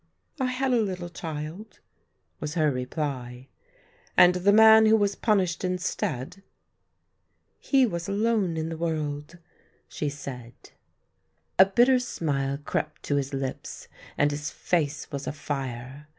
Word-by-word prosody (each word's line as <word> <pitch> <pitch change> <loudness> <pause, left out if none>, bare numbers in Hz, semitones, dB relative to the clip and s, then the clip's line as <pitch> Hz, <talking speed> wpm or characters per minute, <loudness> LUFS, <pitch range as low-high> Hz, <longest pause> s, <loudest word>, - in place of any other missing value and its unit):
" - - -32
I - - +2
had 255 +1 0
a 235 - +3
little 185 -4 -3
child," 165 +5 -7 0.6
was 150 +2 -5
her 155 -3 +3
reply. 125 -1 -4 0.3
" 485 -1 -33
And 180 0 +8
the 180 +3 +3
man 220 +1 +8
who 220 - +6
was 205 -1 +1
punished 195 -6 0
instead? 180 -3 -3 0.4
" - - -50
" - - -49 0.3
He 270 -2 +3
was 170 -4 -4
alone 205 -4 +1
in 160 0 -2
the 165 - -5
world," 155 -1 -3 0.5
she 150 - -3
said. 125 -4 -8 1.0
A 190 - +10
bitter 240 +6 +4
smile 140 - -2
crept 150 +1 -4
to 145 - 0
his 140 -1 -2
lips, 135 -1 -5 0.3
and 145 0 +3
his 145 0 -4
face 155 -4 -2
was 140 -1 -5
afire. 135 -1 -5
160 Hz, 145 wpm, -26 LUFS, 145-200 Hz, 1.0 s, A